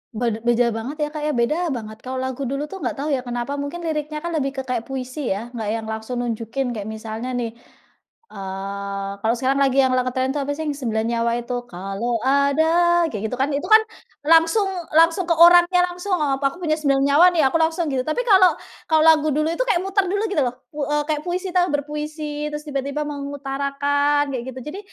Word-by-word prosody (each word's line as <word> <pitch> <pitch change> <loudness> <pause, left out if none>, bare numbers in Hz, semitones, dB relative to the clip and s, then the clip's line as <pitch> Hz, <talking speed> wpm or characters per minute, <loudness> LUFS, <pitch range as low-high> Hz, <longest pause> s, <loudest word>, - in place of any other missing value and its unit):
Be 230 -1 -1
beda 235 +1 +2
banget 225 +6 -5
ya 295 - -1
Kak 305 - -5
ya, - - +1
beda 305 +9 +1
banget, 220 -6 -5
kalau 255 +1 -6
lagu 260 +1 -3
dulu 275 +3 -2
tuh 390 - -7
nggak - - -3
tahu 290 +2 -3
ya 275 - +1
kenapa 245 +4 -3
mungkin 290 +5 -5
liriknya 305 -1 -3
kan 340 - -3
lebih 280 -4 -1
ke 265 - -3
kayak 250 -3 -3
puisi 260 +1 -5
ya, 230 +4 -7
nggak 225 -4 -5
yang 225 - -4
langsung 220 +3 -4
nunjukin 235 +2 -3
kayak 210 -3 -5
misalnya 220 +3 -5
nih, 235 -2 -2 0.8
eee, 195 0 -5
kalau 225 +2 +1
sekarang 270 +2 +1
lagi 270 0 +1
yang 260 - +2
lagi 255 0 +1
ngetren 260 +1 -1
itu 290 - -2
apa 280 0 -2
sih, 315 - -4
yang - - +1
9 220 -3 -1
nyawa 235 0 +1
itu, 245 +1 -4 0.2
kalau 195 +6 -3
ada, 280 +3 +3 0.5
kayak 210 -1 -5
gitu 250 - -3
kan, 275 - +1
itu 285 - -3
kan 435 0 +8 0.5
langsung 330 +6 +5 0.3
langsung 330 +3 +4
ke 335 - +4
orangnya 350 +2 +7
langsung, 360 +2 -2 0.2
aku 275 +1 0
punya 310 -3 +1
9 275 -2 +2
nyawa 290 +5 +6
nih, 320 - +3
aku 295 - +1
langsung 325 +1 +1
gitu, 260 -1 0
tapi 310 +10 0
kalau 375 -4 +6 0.3
kalau 315 -1 +4
lagu 310 -1 +5
dulu 305 +1 +1
itu 340 - 0
kayak 355 -7 +2
muter 390 0 +1
dulu 405 +3 -1
gitu 340 - +1
loh, 245 -1 -2 0.2
pu 295 -1 -4
eee, 295 0 +1
kayak 305 -1 +1
puisi, 365 +2 -2
ta 360 0 +4
berpuisi, 300 +1 -3
terus 300 0 -5
tiba-tiba 280 +1 -2
mengutarakan 285 0 -1
kayak 245 -2 -3
gitu, - - -6
jadi 395 - -6
280 Hz, 210 wpm, -22 LUFS, 240-310 Hz, 0.8 s, kan